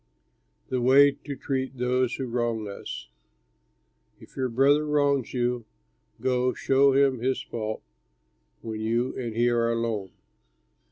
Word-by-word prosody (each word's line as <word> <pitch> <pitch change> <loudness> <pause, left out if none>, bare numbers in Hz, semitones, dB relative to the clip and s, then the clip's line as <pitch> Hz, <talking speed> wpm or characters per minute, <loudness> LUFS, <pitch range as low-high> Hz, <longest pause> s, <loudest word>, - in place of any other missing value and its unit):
THE 130 -1 -1
WAY 140 +3 +6
TO 140 0 -8
TREAT 130 -1 -3
THOSE 125 0 +1
WHO 135 - -4
WRONG 120 -2 -1
US 100 - -7 1.1
"If - - -17
your 130 -1 -1
brother 140 +5 +3
wrongs 145 -4 +1
you, 120 -2 -1 0.5
go, 125 +1 +1
show 135 0 +3
him 135 -2 +3
his 130 +2 0
fault 110 -1 -5 0.8
when 110 -1 -5
you 115 +3 -1
and 120 -4 -4
he 120 +1 +2
are 115 -1 +1
alone. 115 -4 -2
125 Hz, 130 wpm, -26 LUFS, 115-135 Hz, 1.1 s, WAY